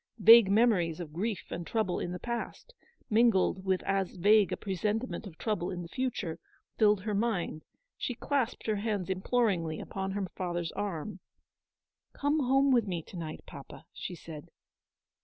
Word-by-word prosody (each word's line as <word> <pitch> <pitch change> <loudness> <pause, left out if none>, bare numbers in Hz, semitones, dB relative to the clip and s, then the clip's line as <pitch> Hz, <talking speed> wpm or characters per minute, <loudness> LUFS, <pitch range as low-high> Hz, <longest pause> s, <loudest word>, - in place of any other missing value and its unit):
Vague 225 -1 +8
memories 195 -7 +3
of 160 -4 -7
grief 200 +4 -2
and 170 -1 -5
trouble 215 -6 0
in 175 - -3
the 180 - -4
past, 235 - -5 0.3
mingled 215 -5 +3
with 190 -1 0
as 195 -1 -1
vague 205 +2 +4
a - - -1
pre 195 -2 -4
sentiment 220 +4 -2
of 165 -4 -12
trouble 210 -6 -2
in 175 -1 -4
the - - -8
future, 195 -6 -3 0.4
filled 210 -3 +4
her 210 +2 -3
mind: 200 -7 -1 0.4
she 250 - -2
clasped 265 -1 -1
her 215 -2 0
hands 200 -3 -2
imploringly 190 -5 0
upon 190 0 -4
her 200 -1 -1
father's 175 -2 -3
arm. 195 0 -4 0.5
" - - -59
Come 290 +2 +2
home 270 +1 +3
with 235 -4 +3
me 175 -4 -3
to - - -13
night, 160 -3 -6
papa," 140 +3 -11
she 180 - -6
said. 155 -3 -10
200 Hz, 170 wpm, -30 LUFS, 175-225 Hz, 0.5 s, Vague